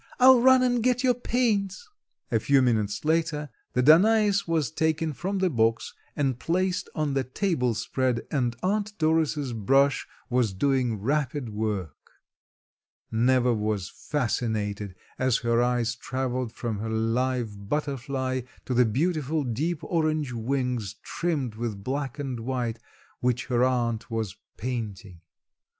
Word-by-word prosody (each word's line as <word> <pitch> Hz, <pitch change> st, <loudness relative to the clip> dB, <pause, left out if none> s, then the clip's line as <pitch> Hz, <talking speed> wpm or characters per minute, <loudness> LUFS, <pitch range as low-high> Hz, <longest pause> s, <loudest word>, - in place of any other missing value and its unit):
"I'll 255 Hz, -1 st, +8 dB
run 260 Hz, 0 st, +6 dB
and 245 Hz, -1 st, +2 dB
get 250 Hz, +1 st, +2 dB
your 255 Hz, -1 st, +4 dB
paints." 235 Hz, -, 0 dB, 0.4 s
A -, -, +3 dB
few 140 Hz, -2 st, +3 dB
minutes 110 Hz, -2 st, 0 dB
later 155 Hz, -2 st, 0 dB, 0.2 s
the 125 Hz, -, +2 dB
Danais 200 Hz, -, +5 dB
was 160 Hz, -4 st, 0 dB
taken 160 Hz, 0 st, 0 dB
from 190 Hz, +8 st, -3 dB
the 190 Hz, -1 st, +2 dB
box 115 Hz, -2 st, +1 dB, 0.2 s
and 135 Hz, -4 st, 0 dB
placed 180 Hz, +2 st, 0 dB
on 150 Hz, -3 st, 0 dB
the 135 Hz, -1 st, +1 dB
tablespread 130 Hz, -, -1 dB
and 125 Hz, -5 st, 0 dB
Aunt 210 Hz, +2 st, -1 dB
Doris' 155 Hz, -4 st, +1 dB
brush 135 Hz, +5 st, +2 dB, 0.2 s
was 120 Hz, -5 st, +1 dB
doing 125 Hz, +1 st, +1 dB
rapid 135 Hz, +2 st, -1 dB
work. 105 Hz, -7 st, -4 dB, 1.0 s
Neva 125 Hz, +2 st, +3 dB
was 105 Hz, -3 st, -1 dB
fascinated 110 Hz, -7 st, -2 dB, 0.2 s
as 130 Hz, -2 st, +3 dB
her 115 Hz, 0 st, +3 dB
eyes 120 Hz, -1 st, +1 dB
traveled 130 Hz, -1 st, -3 dB
from 115 Hz, -3 st, -4 dB
her 110 Hz, +1 st, -3 dB
live 115 Hz, -2 st, -1 dB
butterfly 135 Hz, -3 st, -2 dB, 0.2 s
to 130 Hz, -, -2 dB
the 125 Hz, 0 st, +5 dB
beautiful 150 Hz, +4 st, 0 dB
deep 145 Hz, +7 st, -2 dB
orange 155 Hz, -5 st, 0 dB
wings 120 Hz, -3 st, -2 dB
trimmed 150 Hz, -9 st, -2 dB
with 110 Hz, -3 st, -4 dB
black 135 Hz, +1 st, -3 dB
and 135 Hz, -4 st, -4 dB
white 120 Hz, -1 st, -2 dB, 0.4 s
which 125 Hz, 0 st, 0 dB
her 125 Hz, -1 st, +1 dB
aunt 120 Hz, -3 st, 0 dB
was 110 Hz, -4 st, -3 dB, 0.2 s
painting. 105 Hz, -7 st, -5 dB
130 Hz, 135 wpm, -26 LUFS, 115-155 Hz, 1.0 s, I'll